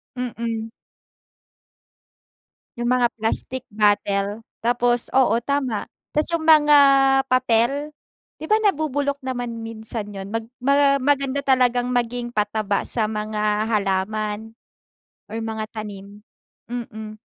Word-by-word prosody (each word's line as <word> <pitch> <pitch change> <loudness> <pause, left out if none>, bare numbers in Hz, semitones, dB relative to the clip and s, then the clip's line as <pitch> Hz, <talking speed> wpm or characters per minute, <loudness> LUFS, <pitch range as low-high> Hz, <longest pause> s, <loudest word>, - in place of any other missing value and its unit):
Mm. 230 -2 -4 2.1
Yung 240 - -1
mga 245 -1 +2
plastic 245 +3 -2
bottle 205 -1 +1 0.2
tapos 240 0 +2
oo 260 -3 +4
tama. 265 -6 -1 0.3
Tas 300 - +2
yung 335 -2 -1
mga 300 -2 +7 0.5
papel, 255 +3 +2 0.5
'di - - -6
ba 430 - +4
nabubulok 285 -7 0
naman 245 -3 -4
minsan 225 -1 -6
yun? 195 0 -7
Mag 225 0 -2 0.2
ma 280 +1 +4
maganda 275 0 +1
talagang 250 -2 +2
maging 245 0 -1
pataba 210 -2 -1
sa 220 -3 0
mga 210 0 -1
halaman 210 +1 -1 0.8
or 220 - -5
mga 220 -1 -4
tanim, 205 -1 -8 0.5
mm. 220 -3 -6
230 Hz, 110 wpm, -22 LUFS, 215-260 Hz, 2.1 s, mga